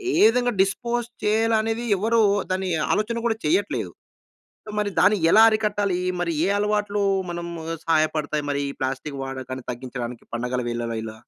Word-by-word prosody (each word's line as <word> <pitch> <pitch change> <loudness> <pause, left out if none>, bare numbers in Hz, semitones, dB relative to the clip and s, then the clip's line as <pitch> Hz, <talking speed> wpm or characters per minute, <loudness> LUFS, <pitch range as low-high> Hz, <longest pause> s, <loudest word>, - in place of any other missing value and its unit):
ఏ - - +2
విధంగా 245 0 +1
డిస్పోజ్ 235 +4 -1 0.2
చేయాలనేది 225 +2 +1
ఎవరు 225 +3 +2 0.3
దాన్ని 185 0 -1 0.2
ఆలోచన 230 +2 -1
కూడా 225 -1 0
చెయ్యట్లేదు. 365 +5 0 0.8
సొ, - - -7
మరి 205 -1 -1
దాన్ని 210 -1 +5
ఎలా 220 - +8
అరికట్టాలి? 205 -4 0 0.2
మరి 170 -2 -1
ఏ - - +1
అలవాట్లు 210 0 0 0.3
మనం 170 0 -5 0.4
సహాయపడతాయి? 155 -2 +1
మరి 140 0 -1
ఈ - - -5
ప్లాస్టిక్ 135 +2 -3
వాడకాన్ని 130 -1 -6
తగ్గించడానికి 120 -1 -6
పండగల 125 +1 -2
వీళ్ళలో 115 -1 -3
ఇలా. 110 0 -7
190 Hz, 145 wpm, -24 LUFS, 135-220 Hz, 0.8 s, ఎలా